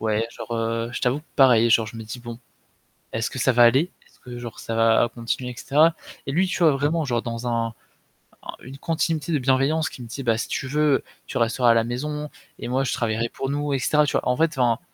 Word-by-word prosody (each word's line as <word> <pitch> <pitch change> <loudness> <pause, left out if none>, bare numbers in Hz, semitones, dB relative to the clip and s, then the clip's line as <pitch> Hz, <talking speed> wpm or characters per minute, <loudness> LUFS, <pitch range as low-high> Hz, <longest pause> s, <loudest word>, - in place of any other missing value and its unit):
Ouais, 110 +1 0
genre, 120 - -8
heu, 115 +1 -2
je - - -4
t'avoue 130 +4 0
pareil, 120 -4 +5
genre 110 -1 +4
je 110 - -9
me 115 - -6
dis: 110 +3 -8
«Bon, 120 -1 -8 0.8
est-ce 115 0 -2
que 130 - -5
ça 130 - +3
va 120 0 +5
aller? 135 +10 +4
Est-ce - - -27
que, 125 -1 -9
genre, 120 -2 -8
ça 115 - -4
va 115 +1 +4
continuer?» 120 +2 -3
et - - -11
cetera. 160 +6 +3 0.3
Et 135 - -1
lui, 180 +6 +2
tu 185 - -3
vois 165 -3 +5
vraiment 145 +4 0
genre 120 -4 -1
dans 115 +1 -4
un 115 -1 -1 0.7
un - - -7
une 135 +2 -10
continuité 165 -1 -1
de 155 - +2
bienveillance 135 +4 +1
qui 125 - -10
me 120 - -9
dit: 135 +4 -6
«Bah, 115 -2 +2
si 115 - -3
tu - - -3
veux, 150 0 +2 0.2
tu - - -3
resteras 120 +1 +2
à - - +6
la 115 0 +3
maison 150 +5 -4 0.3
et - - -6
moi 130 +2 0
je 135 - -1
travaillerai 115 -3 -1
pour 135 +3 -5
nous», 145 0 -2
et 135 - +1
cetera, 150 +4 +3
tu 145 - -1
vois? - - 0
En 125 - +2
fait, 165 +3 +2
enfin 120 -1 +2
125 Hz, 250 wpm, -23 LUFS, 115-145 Hz, 0.8 s, à